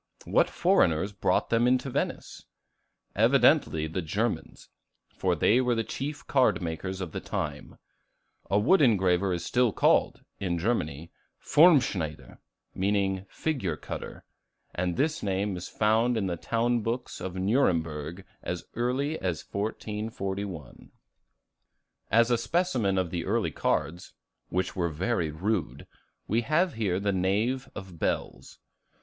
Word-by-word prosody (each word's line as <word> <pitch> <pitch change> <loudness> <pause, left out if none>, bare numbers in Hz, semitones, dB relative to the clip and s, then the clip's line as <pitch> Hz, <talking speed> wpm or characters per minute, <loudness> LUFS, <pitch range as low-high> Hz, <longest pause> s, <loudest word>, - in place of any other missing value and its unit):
What - - +3
foreigners 80 +5 +2
brought 100 - 0
them 120 +2 +4
to 130 +2 -6
Venice? - - -3 0.7
Evidently 80 -1 +4
the 80 +4 -3
Germans; 105 +8 -3 0.5
for 90 -2 +1
they 110 +10 +3
were 125 -1 +1
the 115 - 0
chief 140 +6 -5
card 125 -10 +3
makers 95 +3 -4
of 90 -4 -4
the - - -4
time. - - -5 0.7
A 100 - +3
wood 145 - +4
engraver 95 -6 +3
is 85 -1 -2
still 125 -2 +2
called, - - +2 0.2
in 90 -3 -1
Germany, 85 -6 -2 0.3
Formschneider, 125 - +3 0.3
meaning 95 -1 0
figure 120 - -2
cutter; - - -7 0.5
and 90 -1 -2
this 155 +2 0
name 100 0 -1
is 90 - -6
found 115 +3 +2
in 105 - 0
the 90 -2 -1
town 115 +6 0
books 120 +3 -4
of 95 -1 -5
Nuremburg 90 - 0 0.2
as 90 -1 -4
early 130 +6 -1
as 90 -4 -2
1441. 100 - -4 1.2
As 115 +2 +4
a 120 - +3
specimen 125 - 0
of 90 -3 0
the 85 -2 -2
early 105 -5 0
cards, 85 +4 -2 0.4
which 90 +2 -1
were 85 -3 0
very 85 +2 -1
rude, 80 - -2 0.4
we 115 +3 +1
have 160 +8 +1
here 100 -5 -1
the 100 0 0
Knave 105 +8 0
of 95 -4 -9
Bells. - - -3
100 Hz, 130 wpm, -28 LUFS, 90-120 Hz, 1.2 s, them